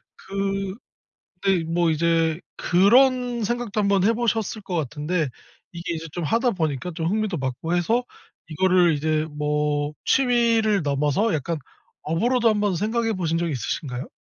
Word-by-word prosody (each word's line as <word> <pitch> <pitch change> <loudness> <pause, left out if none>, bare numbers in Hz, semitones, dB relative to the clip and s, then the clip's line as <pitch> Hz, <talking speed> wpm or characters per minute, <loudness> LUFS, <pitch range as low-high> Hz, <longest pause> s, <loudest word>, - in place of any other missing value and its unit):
그 195 0 -3 0.7
근데 190 -4 +2
뭐 165 0 +1
이제 165 0 +1 0.2
그런 245 +5 +3
생각도 240 -1 -2
한번 200 -2 +2
해 225 +4 +4
보셨을 225 -2 -1
것 185 - -4
같은데 155 +1 -1 0.4
이게 170 -1 -4
이제 165 0 -5
좀 175 - -4
하다 235 - +2
보니까 160 - -2
좀 160 - -3
흥미도 205 -1 0
맞고 135 +6 -2
해서 225 +8 +1 0.5
이거를 180 0 +3
이제 155 +1 0
뭐 150 0 -1
취미를 230 -6 +3
넘어서 150 +9 +1
약간 160 +3 -2 0.4
업으로도 230 +9 +2
한번 205 -3 +1
생각해 225 +4 0
보신 165 -4 -1
적이 170 -1 -1
있으신가요? 130 +1 -4
180 Hz, 300 characters per minute, -23 LUFS, 155-215 Hz, 0.7 s, 해